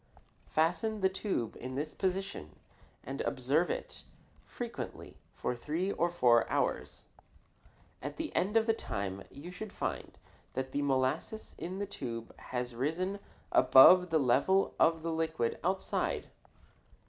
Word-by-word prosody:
Fasten 195 +7 +1
the 190 - +4
tube 190 - -2
in 130 +1 -6
this 150 +3 -3
position 190 - -3 0.5
and 135 +2 -4
observe 140 +6 +1
it - - -4 0.5
frequently - - -7
for 125 - -3
three 160 +10 -2
or 170 -2 +1
four 120 -9 +4
hours. - - -1 1.0
At - - -5
the 320 -1 -4
end 205 +5 +2
of 225 - +4
the 225 - +3
time 100 - -4
you 150 +6 -9
should 205 +3 -7
find - - -4 0.4
that 130 0 -3
the 145 - -1
molasses 135 +10 -1
in 180 +4 -4
the 200 - -2
tube 120 - -6
has 125 -1 -3
risen 170 +11 -1 0.3
above 155 +8 +8
the 160 - +3
level 145 +8 +3
of 165 0 +3
the 165 - -1
liquid 160 -7 -1
outside. 190 +2 -1
160 Hz, 135 wpm, -32 LUFS, 130-190 Hz, 1.0 s, above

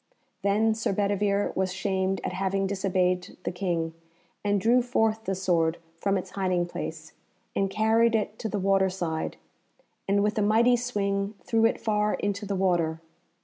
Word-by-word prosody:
Then 215 +3 +2
Sir 220 -2 -1
Bedivere 200 0 +1
was 190 -1 0
shamed 190 0 -1
at - - -3
having 195 +1 0
disobeyed 185 -2 0
the - - -2
King, 175 -3 -2 0.5
and 205 -1 +2
drew 235 +5 +4
forth 225 -2 0
the 195 - -1
sword 170 -3 +1 0.2
from 195 0 +1
its 185 - -6
hiding 185 -3 0
place, 160 -2 -6 0.4
and 195 0 +1
carried 225 +3 +3
it 215 0 -2
to 220 - -3
the 210 - -2
water 195 0 +3
side, 170 -4 -3 0.7
and 200 +1 +3
with 210 +1 +1
a - - +2
mighty 225 +4 +4
swing 205 -4 -1
threw 225 -1 +2
it - - -2
far 210 -1 +1
into 205 0 -3
the 200 - -1
water. 175 -4 +1
195 Hz, 165 wpm, -27 LUFS, 185-210 Hz, 0.7 s, drew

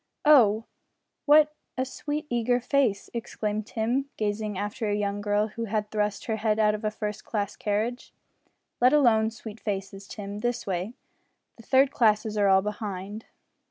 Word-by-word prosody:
"Oh! 230 -8 +6 0.6
what 300 +1 +6 0.2
a 260 - 0
sweet 295 +3 -4
eager 245 0 +1
face!" 245 -5 +1
exclaimed 215 -2 -3
Tim, 245 +5 -1
gazing 210 -1 -2
after 210 +2 -3
a 205 - +1
young 205 0 -2
girl 205 +1 +1
who 230 +2 -5
had 210 -1 -2
thrust 210 -1 -1
her 220 -1 -1
head 215 0 +1
out 210 -1 +3
of 210 +1 -5
a 215 - +1
first 210 -1 -5
class 205 -2 -3
carriage. 220 +4 -2 0.7
"Let 250 +3 +5
alone 230 -7 +4
sweet 225 -1 -10
faces, 195 -1 -5
Tim 205 0 -7
this 240 +1 -2
way. 190 +5 -3 0.6
The - - -12
third 265 +1 +4
classes 215 -3 +2
are 205 -1 +3
all 190 0 +5
behind." 205 0 -5
215 Hz, 160 wpm, -27 LUFS, 205-240 Hz, 0.7 s, Oh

